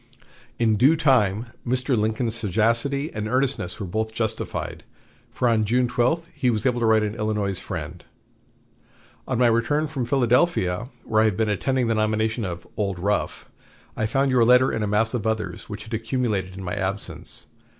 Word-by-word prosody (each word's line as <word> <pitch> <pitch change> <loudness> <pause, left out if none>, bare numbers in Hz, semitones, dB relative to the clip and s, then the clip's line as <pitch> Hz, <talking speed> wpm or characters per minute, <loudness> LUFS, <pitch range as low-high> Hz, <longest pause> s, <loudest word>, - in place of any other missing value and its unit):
In 110 -2 +2
due 135 +9 +5
time 120 - +2
Mr. 125 +1 0
Lincoln's 110 +1 0
sagacity 115 - 0
and 105 0 -3
earnestness 125 -7 0
were 100 - -3
both 110 +4 -3
justified; 110 -1 -3 0.5
for 125 - -1
on 115 -2 +3
June 125 +4 +2
12 125 +8 +1
he 135 -4 0
was 110 -3 -1
able 125 -2 +2
to 115 - +1
write 110 -1 +5
to - - 0
an 105 - -3
Illinois 105 -4 -1
friend: 85 -1 -6 1.2
"On 130 - -1
my 125 - +4
return 120 +7 +2
from 140 -5 -3
Philadelphia, 125 - +2
where 110 0 +2
I - - +4
had 105 -3 +1
been 110 -1 +1
attending 130 +4 0
the 115 - +1
nomination 110 +1 0
of 85 -2 -6
'Old 100 -3 -1
Rough,' 100 +4 -1 0.5
I 110 - 0
found 135 +4 +1
your 125 -2 +4
letter 125 +2 +5
in 110 - -2
a 105 - 0
mass 110 +3 +1
of 115 -3 -1
others 110 -1 -3
which 105 0 -6
had 115 +1 -10
accumulated 110 -5 -2
in 95 - -6
my 90 - -4
absence. 100 +2 -4
110 Hz, 180 wpm, -24 LUFS, 105-125 Hz, 1.2 s, due